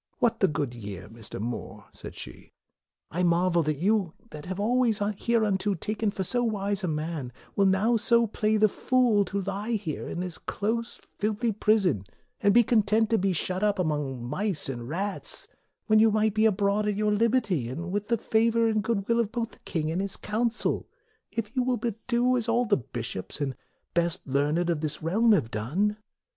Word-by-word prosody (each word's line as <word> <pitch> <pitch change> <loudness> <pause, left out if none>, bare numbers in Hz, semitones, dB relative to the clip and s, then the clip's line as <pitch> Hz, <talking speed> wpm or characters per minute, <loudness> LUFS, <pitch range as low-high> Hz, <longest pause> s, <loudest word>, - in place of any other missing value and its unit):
" - - -42
What 235 -1 +1
the 190 - +4
good 145 -5 -2
year, 100 -5 -7
Mr. 115 -2 -9
More," 115 +3 -5
said - - -9
she, - - -9 0.3
" - - -55
I 175 - -1
marvel 175 0 +3
that 155 -2 -1
you, 195 0 +1 0.2
that 150 -1 -8
have 185 0 -4
been 205 - -1
always 240 -2 +3
hereunto 205 -1 +1
taken 215 +5 -1
for 195 -1 -3
so 245 +6 +1
wise 205 -3 -1
a - - 0
man, 155 -4 -3 0.2
will 200 -1 +4
now 210 +5 +3
so 235 +1 +4
play 215 0 0
the 215 0 +5
fool 250 +1 +2
MORE 200 - +4
47 195 +2 -3
to 195 - -3
lie 205 +4 -4
here 180 -9 -3
in - - -4
this 180 -2 -4
close, 230 +3 -2 0.2
filthy 215 +2 0
prison, 200 - +2 0.4
and 205 -2 +4
be 240 +3 +7
content 220 -1 +2
to 225 - +4
be 195 +1 +1
shut 185 +2 -1
up 210 -1 +2
among 145 -8 -2
mice 180 - 0
and 120 -2 -5
rats, 195 +5 -2 0.4
when 215 0 +4
you 225 +1 +6
might 215 0 +2
be 220 +1 +4
abroad 205 0 +1
at 210 - 0
your 210 0 +1
liberty, 210 - +1
and 170 +8 -5
with 205 +1 -2
the 235 - +2
favor 230 +1 +2
and 215 -1 +1
good 215 -3 -1
will 235 0 +3
both 230 +1 -3
of - - -28
the - - -17
king 155 -2 -1
and 175 +3 -1
his 200 0 -3
Council, 225 +2 -1 0.4
if 225 +2 -4
you 255 - +2
would 250 -3 0
but 225 -2 -4
do 250 +1 +3
as 230 -1 -2
all 240 +2 +2
the 205 -3 +3
bishops 120 -6 -5
and 135 -3 -2 0.4
best 170 -1 +1
learned 150 +5 +1
of 165 -3 0
this 155 -1 -2
Realm 220 +8 +3
have 115 - +1
done. 175 - 0
200 Hz, 205 wpm, -27 LUFS, 165-220 Hz, 0.4 s, be